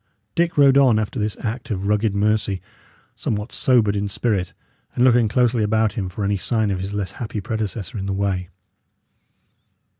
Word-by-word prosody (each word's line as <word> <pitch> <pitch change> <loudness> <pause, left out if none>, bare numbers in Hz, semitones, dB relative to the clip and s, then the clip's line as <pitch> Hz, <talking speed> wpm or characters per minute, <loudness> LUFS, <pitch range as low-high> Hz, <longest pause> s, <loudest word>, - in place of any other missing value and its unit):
Dick 170 -1 0
rode 140 -1 +6
on 125 -5 +5
after 110 +3 -2
this 105 0 -2
act 115 +2 -4
of 100 -3 -3
rugged 105 0 +1
mercy, 105 -1 +1 0.6
somewhat 105 +1 -3
sobered 115 -6 +3
in 100 0 -1
spirit, 100 -3 -1 0.4
and 125 - +2
looking 120 -3 +5
closely 120 +1 +2
about 110 +1 +1
him 95 -6 -3
for 100 +3 -5
any 100 0 +1
sign 110 +1 0
of 95 - -2
his 95 +2 -4
less 100 -3 -3
happy 110 -1 -5
predecessor 110 +1 -3
in 95 - -4
the 100 - -1
way. 95 -2 -1
105 Hz, 175 wpm, -22 LUFS, 100-115 Hz, 0.6 s, rode